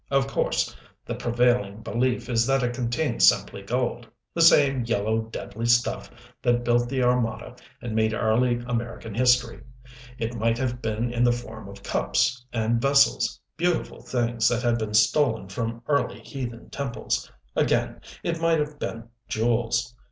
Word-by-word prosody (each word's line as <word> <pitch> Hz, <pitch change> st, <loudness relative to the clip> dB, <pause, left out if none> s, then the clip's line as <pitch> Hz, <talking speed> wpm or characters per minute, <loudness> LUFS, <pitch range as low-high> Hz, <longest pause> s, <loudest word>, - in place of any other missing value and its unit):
Of 135 Hz, -1 st, +2 dB
course 60 Hz, -, -1 dB, 0.3 s
the -, -, -4 dB
prevailing 120 Hz, -3 st, +1 dB
belief 125 Hz, +1 st, -1 dB
is 115 Hz, -1 st, +1 dB
that 135 Hz, -1 st, +2 dB
it 120 Hz, 0 st, 0 dB
contained 120 Hz, -, -1 dB
simply 60 Hz, +9 st, +4 dB
gold 120 Hz, +2 st, -2 dB, 0.3 s
the 170 Hz, -, 0 dB
same, 140 Hz, -6 st, +5 dB
yellow, 110 Hz, -1 st, 0 dB
deadly 110 Hz, 0 st, -5 dB
stuff 120 Hz, 0 st, +2 dB, 0.3 s
that 120 Hz, 0 st, +2 dB
built 120 Hz, 0 st, +2 dB
the 130 Hz, -1 st, 0 dB
Armada 120 Hz, -1 st, 0 dB, 0.3 s
and 120 Hz, -2 st, -4 dB
made 110 Hz, 0 st, +2 dB
early 120 Hz, +2 st, +2 dB
American 115 Hz, -2 st, -4 dB
history. 125 Hz, 0 st, +2 dB, 0.6 s
It 115 Hz, -1 st, -3 dB
might 115 Hz, 0 st, 0 dB
have 125 Hz, -1 st, -2 dB
been 115 Hz, +2 st, -2 dB
in 120 Hz, 0 st, +1 dB
the 120 Hz, -, +5 dB
form 120 Hz, -4 st, -6 dB
of 100 Hz, 0 st, -12 dB
cups 60 Hz, -, 0 dB
and 115 Hz, 0 st, 0 dB
vessels, 140 Hz, -3 st, +3 dB, 0.2 s
beautiful 175 Hz, +1 st, -1 dB
things 120 Hz, -2 st, +1 dB
that 120 Hz, +1 st, -1 dB
had 120 Hz, -1 st, +2 dB
been 105 Hz, -1 st, -3 dB
stolen 110 Hz, -1 st, +3 dB
from 115 Hz, +3 st, -4 dB
early 145 Hz, -1 st, 0 dB
heathen 120 Hz, -4 st, -7 dB
temples 135 Hz, -4 st, -3 dB, 0.2 s
again -, -, +1 dB, 0.2 s
it 165 Hz, -1 st, -2 dB
might 165 Hz, -1 st, +3 dB
have 150 Hz, -1 st, -3 dB
been 115 Hz, 0 st, -4 dB, 0.2 s
jewels. 120 Hz, +2 st, 0 dB
120 Hz, 155 wpm, -25 LUFS, 115-125 Hz, 0.6 s, same